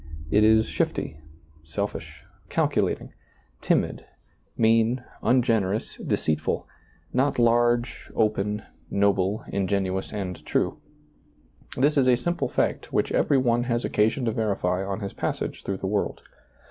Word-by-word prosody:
It 105 Hz, +1 st, +5 dB
is 110 Hz, 0 st, +5 dB
shifty, 75 Hz, -, -2 dB, 0.4 s
selfish, 100 Hz, +6 st, -5 dB, 0.3 s
calculating, -, -, 0 dB, 0.5 s
timid, -, -, +1 dB, 0.5 s
mean, 115 Hz, +2 st, +3 dB, 0.2 s
ungenerous, 115 Hz, -5 st, +1 dB
deceitful 80 Hz, 0 st, -1 dB, 0.2 s
— -, -, -34 dB
not 145 Hz, -, +1 dB
large, 120 Hz, +1 st, +2 dB
open, 105 Hz, -1 st, 0 dB, 0.3 s
noble, 100 Hz, 0 st, +1 dB
ingenuous 95 Hz, -1 st, -1 dB
and 95 Hz, -4 st, -5 dB
true. -, -, 0 dB, 1.0 s
This 145 Hz, +4 st, +3 dB
is 130 Hz, -2 st, +4 dB
a 125 Hz, -1 st, +5 dB
simple 170 Hz, +7 st, -1 dB
fact -, -, -1 dB
which -, -, +1 dB
every 140 Hz, -, +3 dB
one 120 Hz, -2 st, +2 dB
has 120 Hz, -1 st, 0 dB
occasion 110 Hz, +5 st, +1 dB
to 115 Hz, -, +1 dB
verify 95 Hz, -4 st, 0 dB
on 95 Hz, +2 st, -3 dB
his 100 Hz, -, -4 dB
passage -, -, -3 dB
through 100 Hz, -, -2 dB
the 95 Hz, -, -6 dB
world. 100 Hz, +1 st, -1 dB
110 Hz, 125 wpm, -25 LUFS, 100-120 Hz, 1.0 s, It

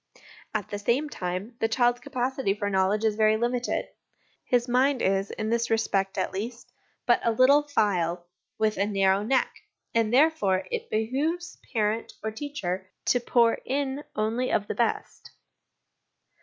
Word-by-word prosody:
At 210 Hz, -3 st, -2 dB
the 205 Hz, -, -3 dB
same 250 Hz, +8 st, 0 dB
time, 185 Hz, +3 st, -4 dB
the 225 Hz, -, +2 dB
child's 240 Hz, +1 st, +2 dB
capacity 255 Hz, -4 st, -1 dB
for 205 Hz, -1 st, -2 dB
knowledge 195 Hz, +3 st, +2 dB
is 220 Hz, -1 st, +2 dB
very 215 Hz, 0 st, +3 dB
limited; 240 Hz, +1 st, -1 dB, 0.6 s
his 245 Hz, 0 st, +1 dB
mind 260 Hz, +2 st, +2 dB
is, 195 Hz, -1 st, +1 dB
in 220 Hz, 0 st, -3 dB
this 235 Hz, 0 st, +1 dB
respect 195 Hz, -4 st, 0 dB
at -, -, -1 dB
least, 230 Hz, +5 st, -6 dB, 0.3 s
but 240 Hz, -, +3 dB
a -, -, +2 dB
little 255 Hz, +5 st, +5 dB
phial 180 Hz, -, 0 dB, 0.3 s
with 215 Hz, -1 st, +1 dB
a 200 Hz, -, +2 dB
narrow 195 Hz, -1 st, +2 dB
neck; 255 Hz, +5 st, 0 dB, 0.3 s
and, 225 Hz, -2 st, +2 dB
therefore, 240 Hz, -10 st, +3 dB
it -, -, -3 dB
behoves 290 Hz, +11 st, -2 dB
parent 220 Hz, -1 st, -1 dB
or 220 Hz, -, -2 dB
teacher 195 Hz, -8 st, -4 dB, 0.2 s
to 245 Hz, -, +3 dB
pour 235 Hz, -1 st, +3 dB
in 275 Hz, +1 st, -2 dB
only 225 Hz, +4 st, 0 dB
of 205 Hz, -, +1 dB
the -, -, -3 dB
best. 235 Hz, -2 st, -2 dB
225 Hz, 155 wpm, -27 LUFS, 205-255 Hz, 0.6 s, little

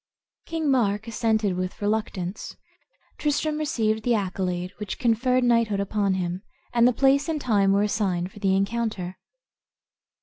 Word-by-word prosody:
King 320 Hz, -3 st, 0 dB
Mark 220 Hz, -4 st, +1 dB
assented 220 Hz, -4 st, 0 dB
with 185 Hz, 0 st, -4 dB
reluctance; 205 Hz, -3 st, -3 dB, 0.6 s
Tristram 300 Hz, +1 st, 0 dB
received 220 Hz, -8 st, 0 dB
the 240 Hz, +1 st, +2 dB
accolade, 185 Hz, -2 st, -2 dB
which 210 Hz, -3 st, -4 dB
conferred 250 Hz, +1 st, +2 dB
knighthood 230 Hz, -4 st, +2 dB
upon 200 Hz, -1 st, 0 dB
him, 180 Hz, 0 st, -3 dB, 0.3 s
and 235 Hz, 0 st, +5 dB
the -, -, +5 dB
place 275 Hz, +4 st, +3 dB
and 315 Hz, -2 st, -1 dB
time 205 Hz, -7 st, +2 dB
were 200 Hz, +1 st, +3 dB
assigned 190 Hz, -4 st, -1 dB
for 205 Hz, -, -13 dB
the 195 Hz, -2 st, +2 dB
encounter. 195 Hz, -3 st, -2 dB
215 Hz, 140 wpm, -25 LUFS, 195-240 Hz, 0.6 s, and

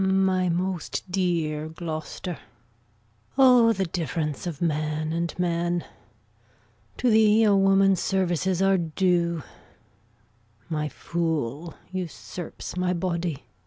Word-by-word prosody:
My 190 Hz, -1 st, +2 dB
most 180 Hz, +1 st, -2 dB
dear 165 Hz, -5 st, 0 dB
Gloucester! 160 Hz, +1 st, -5 dB, 1.0 s
O, 250 Hz, -4 st, +7 dB
the 195 Hz, -3 st, 0 dB
difference 165 Hz, -2 st, -3 dB
of 160 Hz, -5 st, -5 dB
man 155 Hz, -1 st, -1 dB
and 170 Hz, 0 st, -2 dB
man! 175 Hz, -1 st, 0 dB, 1.1 s
To 250 Hz, -, +2 dB
thee 220 Hz, 0 st, +5 dB
a 205 Hz, -2 st, +5 dB
woman's 195 Hz, -1 st, +4 dB
services 185 Hz, -1 st, 0 dB
are 195 Hz, -1 st, +4 dB
due; 170 Hz, -1 st, +1 dB, 1.3 s
My 150 Hz, -2 st, -1 dB
fool 160 Hz, -2 st, -3 dB, 0.2 s
usurps 180 Hz, -1 st, -6 dB
my 180 Hz, 0 st, 0 dB
body. 170 Hz, -3 st, -2 dB
175 Hz, 100 wpm, -25 LUFS, 160-190 Hz, 1.3 s, O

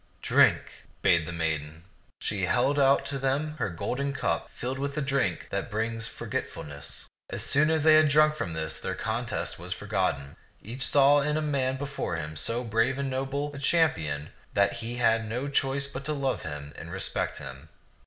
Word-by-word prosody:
" -, -, -35 dB
Drink," -, -, +3 dB, 0.2 s
bade 85 Hz, -2 st, +4 dB
the -, -, -4 dB
maiden; 80 Hz, -3 st, -2 dB
and 95 Hz, -, -22 dB
she 100 Hz, -3 st, 0 dB
held 130 Hz, +8 st, +2 dB
out 135 Hz, 0 st, +4 dB
to 140 Hz, -1 st, -3 dB
them 140 Hz, +3 st, 0 dB
her 115 Hz, -7 st, -1 dB
golden 125 Hz, +10 st, -2 dB
cup, 85 Hz, -11 st, -1 dB
filled 130 Hz, +2 st, -4 dB
with 140 Hz, 0 st, -2 dB
the 150 Hz, -, 0 dB
drink 135 Hz, -11 st, 0 dB
that 100 Hz, +4 st, -2 dB
brings 115 Hz, +1 st, -1 dB
forgetfulness. 70 Hz, -1 st, -5 dB, 0.2 s
As -, -, -3 dB
soon 150 Hz, +2 st, +4 dB
as 160 Hz, -2 st, +2 dB
they 155 Hz, 0 st, +7 dB
had 155 Hz, 0 st, +7 dB
drunk 155 Hz, +1 st, +5 dB
from 85 Hz, -, -4 dB
this, 80 Hz, 0 st, -3 dB
their -, -, -3 dB
contest 115 Hz, -2 st, -2 dB
was 90 Hz, +1 st, -4 dB
forgotten. 90 Hz, -8 st, -2 dB, 0.2 s
Each 125 Hz, +5 st, -4 dB
saw 145 Hz, +1 st, +6 dB
in 150 Hz, +1 st, 0 dB
the 155 Hz, -, +1 dB
man 135 Hz, -3 st, 0 dB
before 140 Hz, +1 st, -3 dB
him 80 Hz, -1 st, -5 dB
so 115 Hz, +11 st, 0 dB
brave 115 Hz, +3 st, +1 dB
and 140 Hz, -1 st, -2 dB
noble 140 Hz, +2 st, -2 dB
a 140 Hz, -, -7 dB
cham 160 Hz, +3 st, +4 dB
pion 75 Hz, -3 st, -4 dB, 0.3 s
that 100 Hz, 0 st, +4 dB
he 115 Hz, +1 st, -5 dB
had 115 Hz, -2 st, +2 dB
no 125 Hz, +5 st, -2 dB
choice 140 Hz, 0 st, +1 dB
but 140 Hz, -1 st, -6 dB
to 155 Hz, -, -1 dB
love 135 Hz, -3 st, -1 dB
him 75 Hz, -1 st, -7 dB
and -, -, -9 dB
re -, -, -4 dB
spect -, -, -1 dB
him. 65 Hz, -1 st, -9 dB
125 Hz, 200 wpm, -28 LUFS, 90-140 Hz, 0.3 s, they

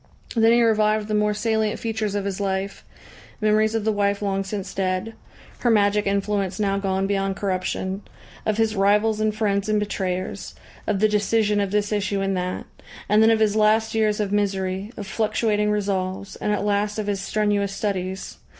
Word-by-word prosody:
Then 225 Hz, 0 st, +5 dB
he 235 Hz, 0 st, +5 dB
revived 215 Hz, -1 st, +2 dB
the 215 Hz, -, -3 dB
more 210 Hz, 0 st, +2 dB
salient 220 Hz, -1 st, 0 dB
features 220 Hz, -3 st, -2 dB
of 200 Hz, -1 st, -1 dB
his 200 Hz, 0 st, -3 dB
life, 195 Hz, 0 st, -2 dB, 0.6 s
memories 215 Hz, +1 st, +2 dB
of 220 Hz, -2 st, -1 dB
the 220 Hz, -, +3 dB
wife 200 Hz, -1 st, +1 dB
long 195 Hz, -1 st, 0 dB
since 195 Hz, 0 st, -5 dB
dead, 185 Hz, +3 st, -1 dB, 0.5 s
her 245 Hz, -, +1 dB
magic 210 Hz, -2 st, +3 dB
influence 200 Hz, -1 st, -1 dB
now 200 Hz, -1 st, +1 dB
gone 195 Hz, -1 st, 0 dB
beyond 195 Hz, -1 st, 0 dB
corruption, 190 Hz, 0 st, -2 dB, 0.4 s
of 215 Hz, -1 st, 0 dB
his 225 Hz, -1 st, +1 dB
rivals 210 Hz, +2 st, +3 dB
and 215 Hz, -1 st, 0 dB
friends 205 Hz, -2 st, 0 dB
and 215 Hz, 0 st, +2 dB
betrayers, 190 Hz, -2 st, -3 dB, 0.3 s
of 205 Hz, -2 st, 0 dB
the 215 Hz, -, +6 dB
decision 210 Hz, 0 st, +1 dB
of 200 Hz, -, -1 dB
this 205 Hz, +1 st, 0 dB
issue 205 Hz, -1 st, 0 dB
and 195 Hz, 0 st, 0 dB
that, 180 Hz, 0 st, -3 dB, 0.4 s
and 210 Hz, +2 st, +4 dB
then 220 Hz, -, +6 dB
of 225 Hz, -1 st, +3 dB
his 215 Hz, -1 st, +2 dB
last 220 Hz, +1 st, +3 dB
years 215 Hz, -1 st, +1 dB
of 205 Hz, -2 st, -1 dB
misery, 195 Hz, 0 st, -1 dB
of 205 Hz, -, -5 dB
fluctuating 210 Hz, 0 st, 0 dB
resolves, 195 Hz, -2 st, -2 dB
and 210 Hz, -, -1 dB
at 205 Hz, -1 st, 0 dB
last 205 Hz, +1 st, 0 dB
of 215 Hz, -, -2 dB
his 200 Hz, -1 st, -2 dB
strenuous 205 Hz, -1 st, 0 dB
studies. 190 Hz, -2 st, -3 dB
205 Hz, 185 wpm, -23 LUFS, 195-215 Hz, 0.6 s, the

